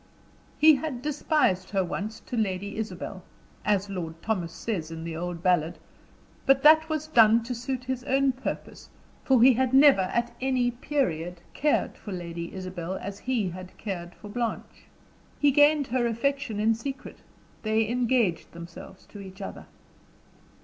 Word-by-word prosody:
He 310 Hz, -1 st, +7 dB
had 265 Hz, -3 st, -5 dB
despised 290 Hz, -, +1 dB
her 195 Hz, -2 st, +1 dB
once 215 Hz, +5 st, -5 dB
to -, -, -6 dB
Lady 200 Hz, -2 st, -2 dB
Isabel 195 Hz, -3 st, -5 dB, 0.4 s
as 200 Hz, -1 st, +1 dB
Lord 165 Hz, -4 st, -5 dB
Thomas 185 Hz, -7 st, -1 dB
says 170 Hz, -4 st, -4 dB
in 165 Hz, 0 st, -7 dB
the 165 Hz, -1 st, -5 dB
old 175 Hz, 0 st, -5 dB
ballad; 175 Hz, -2 st, +2 dB, 0.7 s
but 270 Hz, 0 st, +4 dB
that 315 Hz, +1 st, +7 dB
was 310 Hz, -1 st, -2 dB
done 230 Hz, -6 st, +5 dB
to 240 Hz, +2 st, -4 dB
suit 250 Hz, +1 st, -4 dB
his 255 Hz, -1 st, -3 dB
own 270 Hz, 0 st, +3 dB
purpose, 255 Hz, +1 st, -6 dB, 0.3 s
for 255 Hz, -3 st, +4 dB
he 260 Hz, +1 st, +8 dB
had 260 Hz, +2 st, +1 dB
never, 275 Hz, -6 st, +7 dB
at 235 Hz, +6 st, -1 dB
any 255 Hz, -2 st, +1 dB
period, 180 Hz, -, -2 dB
cared 300 Hz, 0 st, 0 dB
for 205 Hz, -, -8 dB
Lady 170 Hz, -1 st, -6 dB
Isabel 185 Hz, -1 st, -5 dB
as 200 Hz, +1 st, -6 dB
he 240 Hz, -7 st, -1 dB
had 185 Hz, +1 st, -10 dB
cared 175 Hz, -4 st, -6 dB
for -, -, -12 dB
Blanche. 230 Hz, +2 st, -4 dB, 0.5 s
He 290 Hz, -1 st, +4 dB
gained 290 Hz, +1 st, +5 dB
her 245 Hz, -1 st, 0 dB
affection 235 Hz, -1 st, -1 dB
in 220 Hz, +2 st, +3 dB
secret 265 Hz, +4 st, -7 dB, 0.4 s
they 220 Hz, 0 st, +1 dB
engaged 240 Hz, -6 st, 0 dB
themselves 170 Hz, +2 st, -11 dB
to 205 Hz, -, -12 dB
each 190 Hz, 0 st, -10 dB
other. 195 Hz, -, -8 dB
220 Hz, 155 wpm, -27 LUFS, 185-260 Hz, 0.7 s, he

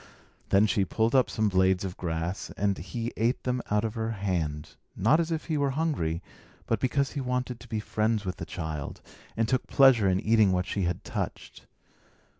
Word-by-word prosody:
Then 100 Hz, +2 st, +5 dB
she 100 Hz, -1 st, +2 dB
pulled 110 Hz, +5 st, 0 dB
up 130 Hz, -3 st, +4 dB
some 110 Hz, -1 st, +1 dB
blades 95 Hz, -1 st, +2 dB
of 95 Hz, -1 st, -5 dB
grass, 85 Hz, +1 st, -3 dB
and 100 Hz, -1 st, +1 dB
he 115 Hz, +7 st, -4 dB
ate 115 Hz, +3 st, +1 dB
them 125 Hz, -1 st, -1 dB
out 105 Hz, +1 st, +2 dB
of 110 Hz, -, -3 dB
her 110 Hz, -1 st, -2 dB
hand, 80 Hz, -7 st, -3 dB, 0.2 s
not 115 Hz, -, +4 dB
as 165 Hz, -1 st, 0 dB
if 160 Hz, -1 st, -2 dB
he 155 Hz, -3 st, -1 dB
were 140 Hz, -1 st, +2 dB
hungry, 90 Hz, -, -1 dB, 0.4 s
but 115 Hz, -, 0 dB
because 135 Hz, +2 st, +1 dB
he 145 Hz, -, -3 dB
wanted 125 Hz, -1 st, -2 dB
to 120 Hz, -, -13 dB
be 110 Hz, -, -1 dB
friends 110 Hz, 0 st, 0 dB
with 90 Hz, -, -3 dB
the -, -, -5 dB
child, 80 Hz, -4 st, -5 dB, 0.4 s
and 115 Hz, 0 st, +2 dB
took 130 Hz, +1 st, 0 dB
pleasure 125 Hz, -8 st, +5 dB
in 95 Hz, 0 st, +2 dB
eating 110 Hz, -1 st, +4 dB
what 90 Hz, 0 st, +1 dB
she 100 Hz, -2 st, -1 dB
had 85 Hz, 0 st, -2 dB
touched. -, -, -5 dB
110 Hz, 200 wpm, -28 LUFS, 95-125 Hz, 0.4 s, Then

